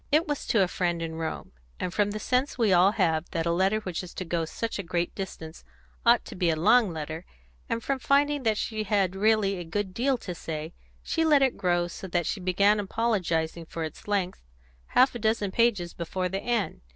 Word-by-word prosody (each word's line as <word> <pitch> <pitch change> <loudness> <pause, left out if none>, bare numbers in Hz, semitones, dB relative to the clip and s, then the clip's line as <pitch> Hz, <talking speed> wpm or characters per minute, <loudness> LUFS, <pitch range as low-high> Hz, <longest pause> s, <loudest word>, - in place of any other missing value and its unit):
It 310 +3 +3
was 290 -1 -3
to 215 -4 +4
a - - +1
friend 175 -1 -1
in 165 -1 -4
Rome, 160 0 -5 0.3
and 180 - -3
from 205 0 +2
the 210 - -4
sense 255 +5 0
we 220 -6 +3
all 185 +3 +5
have 160 -5 +1
that 165 -2 -2
a 170 - +1
letter 190 +5 +2
which 185 -5 -4
is 180 -2 -10
to 185 - -4
go 165 -1 -1
such 225 +7 -4
a - - 0
great 170 -1 -2
distance 165 -4 -7 0.4
ought 235 0 +4
to - - -9
be 180 -2 +1
a 160 - +2
long 215 +5 +4
letter, 160 +1 -5 0.5
and 230 -1 -2
from 275 -1 -1
finding 285 +2 +2
that 220 -4 +1
she 215 -1 -2
had 195 -2 +1
really 200 -2 +2
a - - -4
good 190 +3 -3
deal 260 +5 +1
to 185 -6 -6
say, 160 -1 -6 0.3
she 325 - 0
let 295 -3 +5
it 265 - +2
grow 175 -1 +1
so 185 +2 -8
that 175 -2 0
she 210 - -2
began 200 +3 +3
apologising 180 -7 -1
for 165 - -5
its 155 +4 -8
length 195 -3 -1 0.5
half 260 +1 +4
a 240 - -5
dozen 220 -2 0
pages 205 -6 +1
before 180 +2 -3
the 195 +2 -3
end. 235 -5 -1
195 Hz, 220 wpm, -27 LUFS, 170-225 Hz, 0.5 s, all